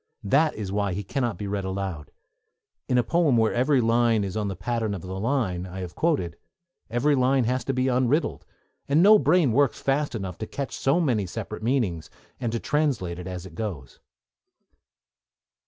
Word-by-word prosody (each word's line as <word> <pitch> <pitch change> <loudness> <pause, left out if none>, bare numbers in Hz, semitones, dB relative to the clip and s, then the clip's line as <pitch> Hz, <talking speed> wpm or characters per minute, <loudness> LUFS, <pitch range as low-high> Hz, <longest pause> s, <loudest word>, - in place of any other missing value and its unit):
That 150 +9 +2
is 100 -3 -5
why 100 -2 0
he 100 +3 -3
cannot 120 0 -2
be 105 - -5
read 100 0 -2
aloud. 95 -5 -4 0.8
In 125 - +3
a 125 - +4
poem 160 -5 +2
where 110 -1 +3
every 130 +3 +3
line 115 -1 +3
is 95 0 -4
on 105 -2 -1
the 95 - -3
pattern 110 +2 -2
of 90 - -8
the 95 +1 -5
line 105 -7 -1
I 95 +1 -7
have 90 -2 -6
quoted, 140 - 0 0.5
every 120 +6 +2
line 130 0 +3
has 125 +3 0
to 135 - -1
be 130 0 0
unriddled; 130 +5 +1 0.5
and 150 +5 +4
no 210 +1 +8
brain 160 -5 +3
works 140 +2 +2
fast 140 -1 0
enough 95 -5 -5
to 110 - -4
catch 135 -5 -5
so 135 +6 +2
many 120 - +1
separate 110 +3 -6
meanings, 110 - -1 0.3
and 120 -3 -2
to 115 - -2
translate 125 - -1
as 90 0 -6
it 95 - -11
goes. 80 - -6
115 Hz, 185 wpm, -25 LUFS, 95-135 Hz, 0.8 s, no